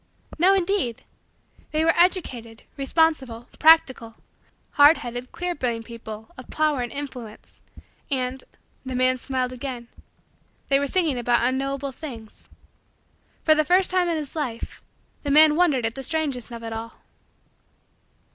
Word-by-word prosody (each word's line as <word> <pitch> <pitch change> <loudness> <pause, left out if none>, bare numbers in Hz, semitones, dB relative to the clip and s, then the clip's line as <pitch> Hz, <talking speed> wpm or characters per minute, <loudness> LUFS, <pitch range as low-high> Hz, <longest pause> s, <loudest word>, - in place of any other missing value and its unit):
No 380 +4 +5
indeed! 370 - -1 0.7
They 310 +1 +1
were 330 - +4
educated, 255 - 0
responsible, 270 -5 0
practical, 260 -8 +4 0.6
hard 290 +3 +6
headed, 245 +1 -7
clear 355 0 -3
brained, 235 -6 -3
people 220 -2 -9
of 255 - -12
power 305 -4 +1
and 240 - -4
influence 255 -6 -8 0.5
and 260 -1 -2 0.4
the 260 -1 -5
man 255 0 +2
smiled 255 -1 -2
again 245 -2 -6 0.8
they 275 0 +4
were 280 - -1
singing 310 -5 0
about 240 0 +2
unknowable 275 +1 -2
things. 245 -6 -10 0.9
For 310 - +6
the 310 0 +2
first 365 +4 +3
time 365 -1 +2
in 330 - 0
his 295 -1 -6
life, 250 -7 -5 0.4
the 285 - -4
man 300 +1 +6
wondered 305 -9 +2
at 225 - -1
the 270 - -7
strangeness 280 -5 -2
of 235 -1 -9
it 225 0 -5
all. 225 +1 -6
265 Hz, 140 wpm, -24 LUFS, 240-310 Hz, 0.9 s, hard